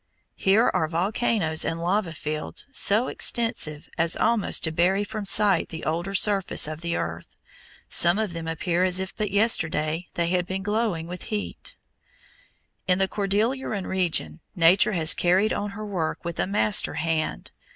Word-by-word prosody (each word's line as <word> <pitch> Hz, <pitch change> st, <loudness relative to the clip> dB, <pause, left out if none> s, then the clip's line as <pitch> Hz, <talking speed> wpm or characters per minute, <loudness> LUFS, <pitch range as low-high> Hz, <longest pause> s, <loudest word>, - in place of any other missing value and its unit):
Here 205 Hz, +5 st, +3 dB
are 160 Hz, -, +1 dB
volcanoes 175 Hz, -1 st, -1 dB
and 165 Hz, -, -3 dB
lava 180 Hz, +1 st, 0 dB
fields 155 Hz, 0 st, -3 dB
so 225 Hz, -1 st, +4 dB
extensive 225 Hz, -11 st, 0 dB
as 165 Hz, +1 st, +1 dB
almost 230 Hz, -3 st, +2 dB
to 160 Hz, -, +2 dB
bury 185 Hz, +5 st, +1 dB
from 215 Hz, 0 st, -6 dB
sight 205 Hz, 0 st, +3 dB
the 160 Hz, -, -8 dB
older 170 Hz, +5 st, -2 dB
surface 195 Hz, -5 st, +3 dB
of 155 Hz, +1 st, -7 dB
the 170 Hz, 0 st, -2 dB
earth. 80 Hz, +1 st, -4 dB, 0.6 s
Some 175 Hz, +2 st, +3 dB
of 215 Hz, -5 st, -2 dB
them 165 Hz, -1 st, -6 dB
appear 170 Hz, +2 st, -1 dB
as 185 Hz, 0 st, +2 dB
if 190 Hz, 0 st, -5 dB
but 210 Hz, -2 st, -2 dB
yesterday 170 Hz, -6 st, 0 dB
they 170 Hz, -1 st, 0 dB
had 180 Hz, 0 st, 0 dB
been 190 Hz, +1 st, -4 dB
glowing 205 Hz, -5 st, -1 dB
with 180 Hz, +1 st, -7 dB
heat. 210 Hz, -2 st, -5 dB, 1.1 s
In 180 Hz, -1 st, +3 dB
the 190 Hz, 0 st, +1 dB
Cordilleran 210 Hz, +2 st, -1 dB
region 165 Hz, -, 0 dB, 0.2 s
Nature 180 Hz, +5 st, +4 dB
has 160 Hz, -3 st, +3 dB
carried 185 Hz, +5 st, +2 dB
on 205 Hz, -, -3 dB
her 215 Hz, -, -6 dB
work 175 Hz, -5 st, -3 dB
with 170 Hz, -1 st, -5 dB
a -, -, 0 dB
master 210 Hz, +1 st, +2 dB
hand. 160 Hz, -1 st, -2 dB
185 Hz, 160 wpm, -24 LUFS, 165-205 Hz, 1.1 s, so